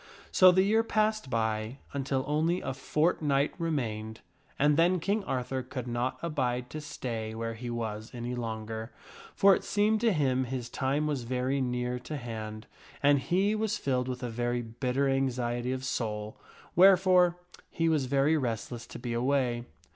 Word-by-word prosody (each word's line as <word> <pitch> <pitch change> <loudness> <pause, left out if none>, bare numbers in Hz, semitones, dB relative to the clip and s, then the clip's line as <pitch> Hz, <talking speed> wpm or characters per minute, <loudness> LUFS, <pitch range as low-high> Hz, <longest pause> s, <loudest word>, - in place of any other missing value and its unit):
So 185 -1 +8
the 190 +1 +4
year 215 +3 +3
passed 215 -6 0
by, 110 +1 -1 0.2
until 135 -1 -1
only 160 +4 +1
a 130 - -4
fortnight 150 0 +1
remained; 110 -9 -2 0.4
and 145 +1 +4
then 175 +3 +3
King 200 +5 0
Arthur 130 -1 -2
could 130 -1 -6
not 125 +2 -1
abide 125 -6 -1
to 155 - -5
stay 115 -6 -5
where 115 0 -3
he 120 +2 -6
was 110 -2 -4
any 120 0 -4
longer, 110 -1 -4 0.4
for 195 -1 +6
it - - -5
seemed 210 +1 +2
to 235 -1 +4
him 130 -6 +1
his 125 -1 -4
time 140 +4 0
was 145 -4 -1
very 130 +3 -1
near 125 0 -1
to 150 +4 -6
hand, 110 -3 -6 0.4
and 145 0 +5
he 190 +9 +1
was 215 -1 0
filled 130 -2 -1
with 125 0 -4
a 125 - -2
very 120 +1 -1
bitter 125 +4 -1
anxiety 125 -2 0
of 130 0 -3
soul, 105 -4 -3 0.4
wherefore 180 -1 +6 0.3
he 165 - 0
was 155 -4 +2
very 140 +4 +3
restless 120 -3 -3
to - - -9
be 120 -1 -4
away. 125 -1 0
130 Hz, 165 wpm, -29 LUFS, 120-155 Hz, 0.4 s, So